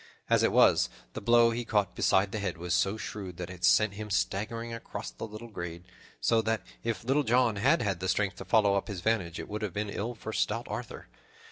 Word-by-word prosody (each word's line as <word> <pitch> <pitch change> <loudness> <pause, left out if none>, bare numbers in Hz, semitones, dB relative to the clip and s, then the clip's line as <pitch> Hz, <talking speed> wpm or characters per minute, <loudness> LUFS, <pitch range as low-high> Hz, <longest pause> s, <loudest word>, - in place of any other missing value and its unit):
As - - +5
it - - +3
was, - - +5 0.2
the - - -5
blow 115 +2 +5
he 120 +1 -2
caught 105 -5 0
beside 95 +1 +2
the 110 - -3
head 95 -5 -3
was 90 +1 -3
so 100 +3 +2
shrewd 95 -5 -6
that 90 0 -5
it 90 -1 -11
sent 105 +3 +5
him 105 +1 -7
staggering 105 - -1
across 115 - -6
the - - -7
little 110 +2 -9
glade, 85 -4 -6 0.4
so 115 -1 +3
that, 110 0 -1 0.2
if 115 -2 -2
Little 135 +5 +2
John 120 -3 +2
had 135 +10 +3
had 100 -5 -1
the 95 +1 -2
strength 100 +1 0
to - - -8
follow 105 -3 +4
up 100 - 0
his 100 -5 -5
vantage, 95 -5 0
it - - -6
would 105 +1 -5
have 105 -5 -3
been 105 +1 -3
ill 115 +5 -3
for 110 0 -7
stout 115 +3 0
Arthur. 120 0 -6
105 Hz, 230 wpm, -29 LUFS, 95-115 Hz, 0.4 s, As